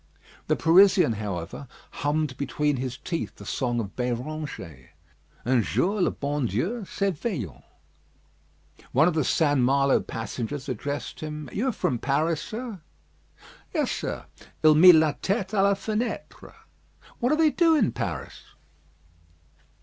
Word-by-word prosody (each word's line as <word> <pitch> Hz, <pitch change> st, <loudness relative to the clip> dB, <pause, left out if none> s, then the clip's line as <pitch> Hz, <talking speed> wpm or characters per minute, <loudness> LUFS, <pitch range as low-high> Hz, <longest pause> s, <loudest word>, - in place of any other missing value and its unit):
The -, -, +2 dB
Parisian, 180 Hz, -, +5 dB
however, 100 Hz, +4 st, -5 dB, 0.2 s
hummed 145 Hz, -1 st, -1 dB
between 145 Hz, +1 st, -1 dB
his 130 Hz, 0 st, -4 dB
teeth 165 Hz, -2 st, -4 dB
the -, -, -12 dB
song 120 Hz, -2 st, -1 dB
of 100 Hz, -4 st, -5 dB
Béranger 125 Hz, -, -5 dB, 0.6 s
"Un 125 Hz, 0 st, +3 dB
jour 195 Hz, -, 0 dB
le -, -, +3 dB
bon 145 Hz, -2 st, -2 dB
Dieu 175 Hz, -, -2 dB
s'éveillant." 180 Hz, -, -3 dB, 1.3 s
One 140 Hz, +6 st, +5 dB
of 180 Hz, -, +2 dB
the 155 Hz, -2 st, +1 dB
St. 145 Hz, 0 st, +2 dB
Malo 140 Hz, +2 st, +3 dB
passengers 120 Hz, +4 st, -5 dB
addressed 140 Hz, +3 st, -4 dB
him: 150 Hz, -3 st, -6 dB
"You 240 Hz, +6 st, -1 dB
are -, -, +2 dB
from 130 Hz, -, -1 dB
Paris, 150 Hz, +5 st, 0 dB
sir?" 220 Hz, -5 st, -6 dB, 0.9 s
"Yes, -, -, +1 dB
sir. -, -, -4 dB, 0.4 s
Il 155 Hz, 0 st, +7 dB
mit 175 Hz, +3 st, +9 dB
la 155 Hz, -1 st, +4 dB
tête 195 Hz, -1 st, -2 dB
à 205 Hz, -3 st, +2 dB
la 200 Hz, 0 st, +4 dB
fenêtre." 215 Hz, +4 st, -4 dB, 0.7 s
"What 245 Hz, -, +1 dB
do 305 Hz, -, +3 dB
they 315 Hz, -1 st, +4 dB
do 330 Hz, 0 st, +4 dB
in 245 Hz, -10 st, +2 dB
Paris?" 80 Hz, -10 st, -5 dB
150 Hz, 135 wpm, -26 LUFS, 125-190 Hz, 1.3 s, mit